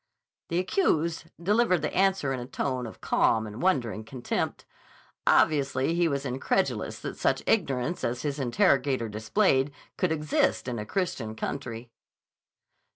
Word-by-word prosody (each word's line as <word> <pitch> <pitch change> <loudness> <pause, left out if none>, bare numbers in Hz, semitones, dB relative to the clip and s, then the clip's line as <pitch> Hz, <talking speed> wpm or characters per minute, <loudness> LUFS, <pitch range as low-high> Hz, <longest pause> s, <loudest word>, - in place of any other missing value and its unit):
_" - - -60
The 170 - 0
accused 170 - +1
delivered 190 -2 +2
the 150 - -1
answer 190 -7 +2
in 130 - -3
a 120 - -6
tone 130 -2 -2
of 110 - -12
calm 110 -1 +2
and 105 +2 -7
wondering 120 -12 +1
contempt. 120 +2 -3 0.6
Obviously 140 0 +3
he 170 0 +2
was 140 -2 -2
incredulous 130 0 -1
that - - -5
such - - +1
ignorance 150 - 0
as 120 +1 -2
his 145 -1 -2
interrogator 130 0 +2
displayed 130 - +2 0.3
could 185 - +1
exist 150 -3 +1
in 120 -3 -3
a 105 - -6
Christian 130 - -2
country. 115 -1 -5
135 Hz, 145 wpm, -27 LUFS, 120-170 Hz, 0.6 s, Obviously